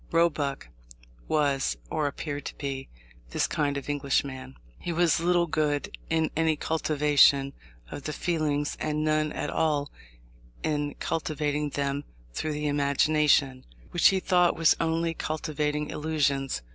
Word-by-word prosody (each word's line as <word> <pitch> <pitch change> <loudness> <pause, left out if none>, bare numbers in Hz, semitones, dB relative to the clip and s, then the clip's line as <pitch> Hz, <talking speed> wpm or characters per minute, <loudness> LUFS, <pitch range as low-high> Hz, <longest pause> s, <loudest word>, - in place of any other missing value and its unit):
Roebuck 150 - +1 0.6
was, 140 - +1
or 150 - 0
appeared 145 0 -4
to - - -6
be, 135 -2 -5 0.4
this - - +1
kind 145 -2 -1
of 140 - -6
Englishman. 140 - -1 0.2
He 175 - -4
saw 165 0 +2
little 175 0 +3
good 150 -3 -1
in 160 -1 +1
any 160 -1 +2
cultivation 145 -3 +3 0.4
of 145 - -7
the 155 - -2
feelings, 150 -3 -1
and 155 0 -1
none 155 0 +1
at 145 - -3
all 150 -3 0 0.7
in 145 -2 -1
cultivating 150 -2 -2
them 140 0 -2 0.3
through 155 - -2
the 150 0 -3
imagination, 145 -1 +2 0.3
which 175 - +5
he 190 - +3
thought 180 -1 +3
was 165 -1 +5
only 165 0 0
cultivating 150 -2 -2
illusions. 140 - -1
150 Hz, 135 wpm, -27 LUFS, 140-155 Hz, 0.7 s, which